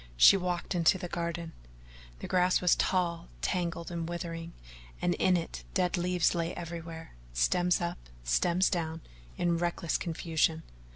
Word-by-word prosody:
She - - +9
walked 180 -2 -2
into 175 +1 +4
the 180 -1 -5
garden. 170 -1 -3 0.7
The - - -5
grass 180 0 +3
was 180 -1 +4
tall, 170 -2 0 0.2
tangled, 170 -2 -1
and 170 -1 -3
withering, 170 -1 -5 0.5
and 175 - +1
in 180 +1 +3
it 165 - -5
dead 180 -1 +2
leaves 180 -1 +2
lay 170 -1 -2
everywhere, 165 -1 -7 0.2
stems 175 - +2
up, 170 0 -3 0.2
stems 175 - +2
down, 165 -3 -2 0.4
in 170 -1 +1
reckless 170 -1 -1
confusion. 160 -1 0
170 Hz, 140 wpm, -30 LUFS, 165-180 Hz, 0.7 s, She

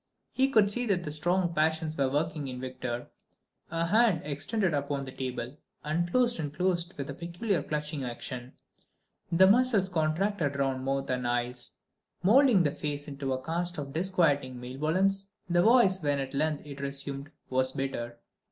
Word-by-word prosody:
He 265 +1 +2
could 215 -6 +4
see 245 +3 0
that 175 -7 0
strong 175 +3 +1
passions 160 0 +1
were 135 -3 +1
working 150 0 -1
in 125 -1 -6
Victor: 125 -2 -5 0.6
a 165 +1 0
hand, 215 -2 +3
extended 170 +6 -1
upon 140 -1 -1
the 130 - -8
table, 130 0 -5 0.3
unclosed 175 +10 +2
and 150 -3 -3
closed 175 +2 0
with 140 -1 -4
a - - -5
peculiar 175 +3 -2
clutching 150 -1 -3
action; 125 +1 -6 0.8
the 180 +3 +6
muscles 210 -2 +4
contracted 165 -1 0
round 135 -2 -1
mouth 135 0 -1
and 125 -1 -1
eyes, 120 0 -1 0.5
moulding 230 -1 +6
the 145 - +2
face 145 0 -4
into 140 -2 -4
a 130 0 -4
cast 175 +2 0
of 140 -2 -5
disquieting 155 -7 +1
malevolence. 175 +10 0 0.2
The 175 0 +3
voice, 205 -3 +5
when 145 -2 +1
at 135 0 -4
length 150 +1 0
it 140 -1 -8
resumed, 140 0 -4 0.2
was 130 0 +3
bitter. 120 -3 -4
155 Hz, 160 wpm, -29 LUFS, 135-180 Hz, 0.8 s, the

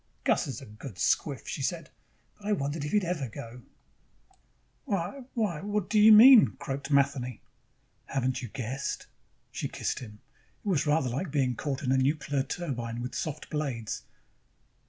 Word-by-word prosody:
"Gus - - +2
is - - -5
a - - -9
good 105 +2 -10
squiff," 135 - 0
she - - -4
said, 160 +4 -3 0.4
"but 205 - -10
I 210 - +3
wondered 145 -3 -2
if 150 - -3
he'd 210 -2 +3
ever 165 -8 -2
go." 115 +3 -9 1.2
"Why, 200 +3 -3
why... 205 -10 0
what 205 -1 -2
do 215 - +4
you 215 +1 +9
mean?" 230 +2 +9
croaked 140 -4 -5
Matheny. 140 -4 +1 0.7
"Haven't 130 -1 -1
you 125 - -5
guessed?" 130 +3 -4 0.5
She - - -3
kissed - - -3
him. 105 -4 -10 0.5
It - - -6
was 160 -6 +1
rather 150 -3 +2
like 145 +9 -3
being 135 -4 +1
caught 140 +3 -3
in 130 - +1
a 135 - +4
nuclear 145 0 +1
turbine 130 -6 -4
with 125 +1 -5
soft 155 -1 -4
blades. 135 -8 -3
140 Hz, 165 wpm, -29 LUFS, 125-175 Hz, 1.2 s, you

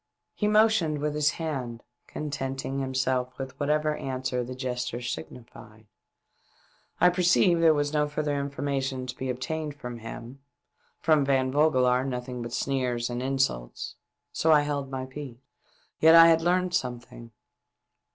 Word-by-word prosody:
He 210 - -1
motioned 210 -7 +3
with 150 +1 -2
his 150 0 +2
hand, 130 -8 -4 0.2
contenting 135 -2 -4
himself 130 -1 -1
with 135 -1 -5
whatever 150 +1 +1
answer 130 -1 -2
the 130 +1 -7
gesture 125 -2 -3
signified. 110 +1 -8 1.1
I 180 - +6
perceived 180 -1 +3
there 165 -1 +6
was 145 0 -1
no 150 -1 +2
further 150 0 -2
information 140 -2 -2
to 125 0 -6
be 130 +1 -4
obtained 150 +4 -3
from 125 -4 -7
him 115 +3 -9 0.3
— - - -42
from 155 -3 +4
Van 135 -1 +1
Vogelaar 130 -4 +3
nothing 125 -1 -4
but 120 0 -6
sneers 125 -2 -1
and 120 +1 -3
insults 130 - -2 0.2
— - - -57
and - - -11
so 160 - +3
held 145 -2 +1
my 130 -1 -4
peace. 130 -2 -8 0.6
Yet 160 +1 +7
I 165 0 +9
had 165 0 +4
learnt 180 +1 +1
something. 120 -5 -4
135 Hz, 150 wpm, -27 LUFS, 125-150 Hz, 1.1 s, I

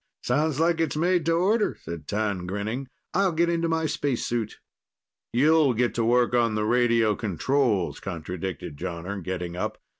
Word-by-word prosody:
"Sounds 150 +3 +1
like 165 0 +2
it's 165 - 0
made 175 0 +2
to 165 - +3
order," 205 +6 +2
said 85 -2 -8
T'an, 100 -4 -1
grinning. 110 +7 -3 0.3
"I'll 195 0 +3
get 170 +1 +2
into 165 -1 0
my 160 0 +1
spacesuit." 125 -7 -2 0.7
"You'll 145 +1 +4
get 120 +1 +1
to 115 - 0
work 120 +1 +3
on 115 -3 +2
the 105 0 0
radio 115 -2 +3
controls," 110 - 0
contradicted 90 -3 -5
Jonner, 90 +3 -5
getting 90 -1 -4
up. 90 - -3
120 Hz, 155 wpm, -26 LUFS, 100-155 Hz, 0.7 s, You'll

